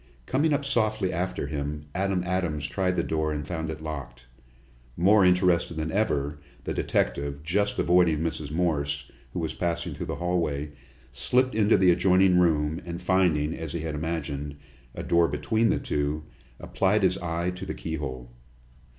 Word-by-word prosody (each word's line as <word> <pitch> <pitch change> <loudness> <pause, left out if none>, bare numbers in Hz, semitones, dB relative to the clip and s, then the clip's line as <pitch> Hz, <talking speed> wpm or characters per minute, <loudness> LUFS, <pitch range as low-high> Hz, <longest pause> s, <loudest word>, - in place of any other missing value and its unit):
Coming 150 - +1
up 145 -1 +1
softly 110 -7 +1
after 90 -3 -2
him, 75 0 -4
Adam 95 0 0
Adams 90 -5 -1
tried 90 +3 0
the - - +1
door 80 -1 -1
and 75 -1 -3
found 80 -2 -3
it 80 0 -6
locked. 65 -6 -7 0.7
More 100 +4 +5
interested 90 -2 +3
than 80 0 -2
ever, 75 -8 0 0.2
the - - -3
detective, 70 +3 -1
just 100 +5 0
avoiding 85 -2 +4
Mrs. 80 -3 -3
Morse, 75 -3 -1 0.2
who - - -5
was 80 -2 -2
passing 85 -1 -2
through - - -6
the - - -3
hallway, 80 -5 -1 0.4
slipped 130 - +1
into 105 0 +4
the 95 -2 +5
adjoining 90 +1 +4
room, 80 -1 +2
and 85 0 -5
finding, 90 -5 +2
as 80 -2 -6
he 85 - -3
had 80 -1 -3
imagined, 75 -2 -3 0.4
a - - -5
door 85 0 +3
between 110 +11 +1
the - - +2
two, 75 +1 -2 0.4
applied 100 +2 +1
his 95 0 +2
eye 85 +1 -1
to 90 - -7
the - - -4
keyhole. 65 -7 -5
85 Hz, 165 wpm, -27 LUFS, 75-90 Hz, 0.7 s, More